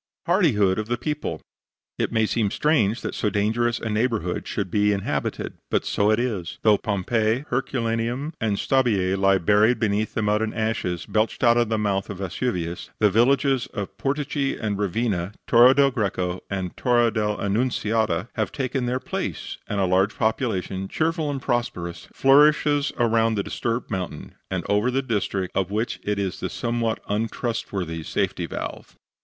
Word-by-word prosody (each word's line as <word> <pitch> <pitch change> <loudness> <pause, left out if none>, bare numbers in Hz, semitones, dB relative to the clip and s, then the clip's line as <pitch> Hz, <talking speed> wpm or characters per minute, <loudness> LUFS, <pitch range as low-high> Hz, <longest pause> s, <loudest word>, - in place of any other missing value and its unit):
HARDIHOOD 115 - +3
OF 110 - -3
THE 120 +1 -1
PEOPLE 150 +3 -3 0.6
It - - 0
may 110 -1 +2
seem 110 -1 0
strange 120 -5 +1
that - - -4
so 105 - 0
dangerous 115 +4 +1
a - - -4
neighborhood 110 -5 -1
should 95 -4 -3
be 105 0 +3
inhabited. 100 -1 -2
But - - 0
so 100 +1 +1
it 110 +1 +3
is. 105 -9 -2
Though 105 -2 +5
Pompeii, 110 +5 0
Herculaneum 120 +2 -1
and 105 -3 0
Stabiae 105 -9 +2
lie 95 0 +4
buried 105 +6 +3
beneath 110 -1 0
the 110 - 0
mud 105 +1 +2
and 110 -1 -2
ashes 110 -6 -1
belched 110 +3 0
out 120 -1 +5
of 120 -2 +2
the 110 - +1
mouth 100 -2 -1
of 100 - -5
Vesuvius, 90 -3 -3
the 105 -2 +3
villages 135 +3 +3
of 100 -4 -4
Portici 140 0 -1
and 105 -2 -1
Revina, 100 -2 -1
Torre 125 +3 +7
del 140 -1 +4
Greco 95 -6 -2
and 95 -2 -3
Torre 120 -2 +3
del 105 -1 -1
Annunziata 110 -3 0
have 110 -5 -1
taken 130 -1 -2
their 125 +1 0
place, - - -4
and 105 - -2
a 95 - +3
large 95 +3 +2
population, 95 -4 -1
cheerful 160 - -1
and 135 -2 -4
prosperous, 90 -8 -2
flourishes 145 +1 +4
around 115 -1 +2
the 100 - 0
disturbed 115 +4 -3
mountain 90 -5 -4 0.2
and - - -3
over 105 +4 +2
the 135 +2 0
district 100 -5 -2
of 95 -2 0
which 105 -3 -2
it 105 +1 -2
is 95 -2 -2
the - - -3
somewhat 115 -2 -1
untrustworthy 105 -6 -2
safety - - -2
valve. - - -7
110 Hz, 165 wpm, -24 LUFS, 100-120 Hz, 0.6 s, Torre